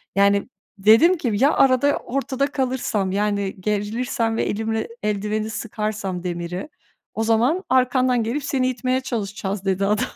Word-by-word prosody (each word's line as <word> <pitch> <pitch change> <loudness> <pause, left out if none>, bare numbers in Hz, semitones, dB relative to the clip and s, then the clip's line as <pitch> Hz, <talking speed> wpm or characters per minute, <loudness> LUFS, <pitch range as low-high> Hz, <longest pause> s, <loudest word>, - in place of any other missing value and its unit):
Yani 200 +3 +3 0.3
dedim 225 - +5
ki 245 -8 -1
ya 275 +8 +3
arada, 270 +2 +3
ortada 275 +1 -2
kalırsam, 250 -8 -1
yani, 200 -1 -1
gerilirsem 225 +3 -1
ve - - +1
elimle 220 +1 -2 0.2
eldiveni 210 +1 -1
sıkarsam 210 -5 -4
demiri, 175 - -4 0.4
o 225 - -1
zaman 240 - +2
arkandan 255 -1 +3
gelip 250 +6 -2
seni 265 -2 0
itmeye 255 +1 -1
çalışacağız, 205 -5 -4
dedi 195 0 +1
adam. 210 +4 +1
220 Hz, 135 wpm, -22 LUFS, 200-255 Hz, 0.4 s, dedim